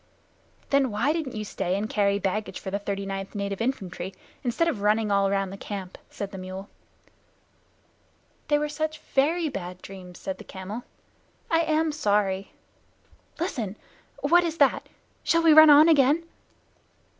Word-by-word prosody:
"Then 275 -2 +3
why 235 +8 +1
didn't 310 -7 -3
you 215 0 -4
stay 185 -2 -2
and 210 +2 -2
carry 200 -2 +1
baggage 205 +2 -2
for 190 - -6
the 200 - -1
39th 195 0 -4
Native 200 0 -3
Infantry, 195 -6 -3 0.3
instead 250 +7 +1
of 250 -12 -1
running 210 +1 +2
all 200 0 +3
round 195 -1 -1
the - - -7
camp?" 195 -2 -6
said 200 -1 -6
the 195 - -7
mule. 185 +1 -7 1.8
"They 295 - +3
were 300 0 -1
such 310 +1 -3
very 315 +4 +1
bad 180 -9 -6
dreams," 185 -2 -10
said 190 -1 -5
the - - -9
camel. 200 +5 -7 0.7
"I 330 - +4
am 315 -1 +1
sorry. 200 -8 0 0.9
Listen! 230 - -3 0.5
What 345 +5 +5
is 330 -1 -2
that? - - +2 0.3
Shall 335 0 +2
we 325 -1 +7
run 315 0 +9
on 295 +2 +8
again?" 300 +1 +4
210 Hz, 155 wpm, -26 LUFS, 195-300 Hz, 1.8 s, run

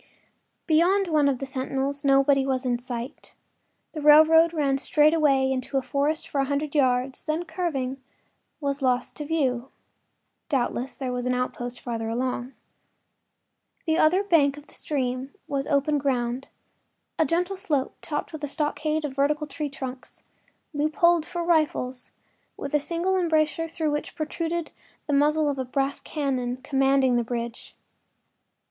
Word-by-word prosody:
Beyond 360 +4 +3
one 300 -3 +3
of 270 - 0
the 275 - -5
sentinels 270 +2 -2
nobody 275 0 +4
was 265 -1 -1
in 245 -1 0
sight; 245 +2 -7 0.6
the 310 - -6
railroad 315 +2 +7
ran 280 -4 +1
straight 300 +2 +3
away 275 -4 +3
into 265 +1 -2
a 265 - 0
forest 290 +4 -1
for 280 - 0
a - - +1
hundred 285 +1 -2
yards, 260 -2 +1
then, 315 +3 -2
curving, 270 -8 -3 0.6
was 280 -1 -2
lost 250 -2 0
to 295 - -5
view. 270 -5 0 0.8
Doubtless 260 -1 -1
there 260 -2 -3
was 250 0 -2
an 250 - +1
outpost 245 -1 -3
farther 225 -2 -3
along. 250 +2 -2 1.3
The 320 -1 +1
other 360 +6 +4
bank 295 -8 +3
of 295 - -12
the - - -19
stream 260 -2 -3
was 275 -1 -2
open 285 +1 +2
ground—a 260 +3 -4
gentle 355 +3 0
slope 305 -9 -1
topped 300 +2 -4
with 305 -1 -7
a - - 0
stockade 305 +1 -1
of 280 - -4
vertical 295 +2 +1
tree 295 0 -4
trunks, 260 -2 -8 0.5
loopholed 310 +3 +2
for 345 -1 -3
rifles, 305 -7 0 0.5
with 280 - -6
a 295 - +4
single 345 +5 0
embrasure 330 -1 +1
through 320 -2 -2
which 295 0 -3
protruded 330 +1 -3 0.3
the 295 - -2
muzzle 300 +2 +3
of 280 -2 -1
a - - 0
brass 270 +2 -2
cannon 255 -4 -2
commanding 270 -1 +2
the 240 - +1
bridge. 235 0 -5
280 Hz, 150 wpm, -25 LUFS, 260-310 Hz, 1.3 s, railroad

